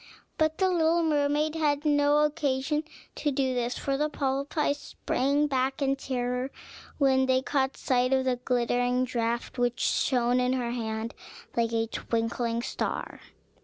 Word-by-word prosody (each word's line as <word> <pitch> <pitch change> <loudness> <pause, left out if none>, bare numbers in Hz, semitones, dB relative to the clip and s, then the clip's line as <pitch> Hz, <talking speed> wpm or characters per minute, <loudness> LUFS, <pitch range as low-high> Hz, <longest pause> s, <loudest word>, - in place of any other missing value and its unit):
But 315 0 +2
the 380 - +3
little 340 -1 +2
mermaid 300 0 +1
had 300 -2 0
no 290 0 +4
occasion 300 0 0 0.3
to 295 - -1
do 265 -2 0
this, 245 0 -1
for 275 -1 -1
the 300 +2 0
polypi 280 +1 0
sprang 285 0 0
back 265 -1 0
in 275 -1 +1
terror 250 -1 -2 0.5
when 265 -2 +3
they 260 0 +2
caught 270 -1 0
sight 250 0 +1
of 265 -1 +2
the 255 -1 +1
glittering 245 0 +1
draught, 235 0 -2
which 245 0 +1
shone 245 -1 +2
in 250 0 +2
her 245 -2 -1
hand 225 -1 -3 0.4
like 230 -1 +1
a 225 -1 +1
twinkling 230 +1 -2
star. - - -3
265 Hz, 150 wpm, -28 LUFS, 245-290 Hz, 0.5 s, no